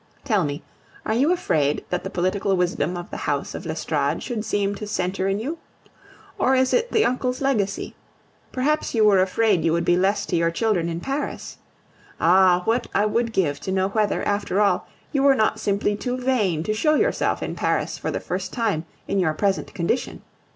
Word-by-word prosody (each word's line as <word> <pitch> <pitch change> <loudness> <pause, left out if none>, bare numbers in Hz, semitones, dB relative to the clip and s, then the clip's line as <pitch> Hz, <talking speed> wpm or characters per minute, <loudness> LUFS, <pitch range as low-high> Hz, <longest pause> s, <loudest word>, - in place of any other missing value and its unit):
Tell 215 -8 +2
me, 145 -1 -4 0.4
are 220 - 0
you 270 +8 +3
afraid 150 - 0
that 180 - -1
the - - -4
political 190 +2 0
wisdom 180 -1 0
of 175 - -8
the - - -5
house - - -2
of - - -7
l'Estorade - - -1
should 230 -4 -3
seem 205 -2 0
to 205 +1 -6
centre 190 -1 -1
in 195 0 +1
you? 300 +9 -4 0.8
Or 265 - +3
is 260 0 +2
it 480 0 +1
the 440 - +3
uncle's 255 0 -1
legacy? 215 -8 -1 0.6
Perhaps 295 +1 0
you 220 -1 +4
were 200 -3 +5
afraid 190 -1 +2
you 165 -1 +2
would 170 0 0
be 175 - +4
less 195 +3 +1
to 180 - -2
your 165 0 +2
children 175 -2 0
in 170 0 -4
Paris? 275 +6 -4 0.6
Ah! 180 +1 +5
what 235 +2 +1
I 205 - +3
would 230 +2 0
give 150 -9 0
to 190 - -4
know 190 0 +1
whether, 210 0 0
after 205 -1 0
all, 205 -1 +2 0.2
you 275 - +1
were 275 -1 +5
not 215 -3 +1
simply 205 0 0
too 250 +4 -3
vain 220 -11 0
to 215 - -1
show 305 +8 +2
yourself - - +1
in - - -3
Paris - - -1
for - - -3
the - - -2
first - - -4
time 210 -10 -1 0.2
in 200 - 0
your 160 -4 +2
present 195 +2 0
condition! 195 +8 -2
205 Hz, 200 wpm, -23 LUFS, 180-240 Hz, 0.8 s, were